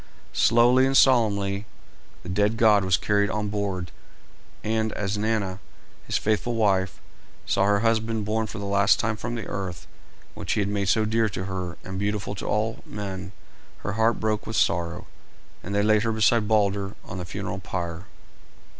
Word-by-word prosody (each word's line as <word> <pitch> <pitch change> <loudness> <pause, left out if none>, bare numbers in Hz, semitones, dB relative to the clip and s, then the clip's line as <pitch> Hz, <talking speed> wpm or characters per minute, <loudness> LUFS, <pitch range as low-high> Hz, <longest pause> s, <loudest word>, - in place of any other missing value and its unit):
Slowly 120 +3 +5
and 135 0 +3
solemnly 105 -5 +3 0.6
the 90 - -8
dead 105 +4 +1
god 105 -3 +5
was 95 -1 +3
carried 105 +1 +1
on 105 -1 -2
board, 100 -4 -3 0.7
and 110 0 0
as 100 0 -2
Nanna, 105 -3 -1 0.5
his - - +1
faithful 110 +3 0
wife, 100 -4 +1 0.5
saw 100 - +2
her 100 0 +3
husband 115 -1 +1
borne 110 +1 0
for 110 - -7
the 100 - -5
last 100 +1 +3
time 115 -1 0
from 120 +2 -4
the 110 -4 -4
earth 95 -4 -5 0.5
which - - -3
he - - 0
had 100 - -1
made 100 -1 -1 0.2
dear 115 0 +2
to 90 -1 -4
her 90 -2 -4
and 95 0 -5
beautiful 100 0 -2
to 100 - -6
all 110 +1 0
men, 95 -3 -6 0.5
her 100 - -3
heart 110 +2 +2
broke 110 -1 -1
with 110 - -4
sorrow, 85 -1 0 0.6
and 100 +3 -5
they 100 - +3
laid 110 0 +4
her 115 +1 0
beside 110 0 +3
Balder 100 -2 +1
on 95 - -6
the - - -4
funeral 100 +1 -5
pyre. 90 0 -5
105 Hz, 170 wpm, -25 LUFS, 95-110 Hz, 0.7 s, Slowly